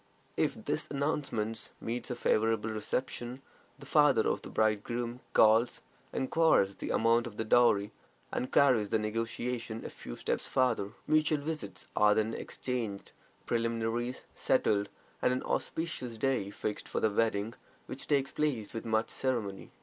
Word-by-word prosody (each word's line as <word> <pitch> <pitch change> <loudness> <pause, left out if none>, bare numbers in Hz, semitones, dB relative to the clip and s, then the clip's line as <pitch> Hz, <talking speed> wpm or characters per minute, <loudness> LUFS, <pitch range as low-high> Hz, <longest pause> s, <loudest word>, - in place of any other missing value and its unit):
If - - -1
this - - -1
announcement 135 -6 -2
meets 120 +1 -4
a 125 - -2
favorable 110 -1 +1
reception, 120 +3 -3 0.3
the 140 - -12
father 145 -5 +4
of - - 0
the - - -9
bridegroom 115 +3 0
calls, 110 +2 +5 0.3
inquires 130 -8 +3
the - - -5
amount 115 +1 +3
of 105 -2 -10
the 110 - -2
dowry, 110 -3 +4 0.4
and 125 - -2
carries 125 -7 +4
the - - +3
negotiation 115 +1 -3
a - - -5
few - - -8
steps - - -2
farther. 115 -6 +1
Mutual 155 0 +3
visits 130 - -5
are 105 0 +5
then 110 +1 +1
exchanged, 115 -7 -4 0.3
preliminaries 115 +1 -1
settled, 100 -1 +2 0.3
and 125 - +3
an 130 - -2
auspicious 145 -8 -3
day 125 -4 0
fixed 105 0 -4
for - - -1
the 110 - +2
wedding, 110 0 +1 0.3
which 135 - -6
takes 140 -2 +2
place 135 -9 -1
with 115 - -5
much 110 0 +1
ceremony. 115 -7 -2
115 Hz, 145 wpm, -31 LUFS, 110-130 Hz, 0.4 s, calls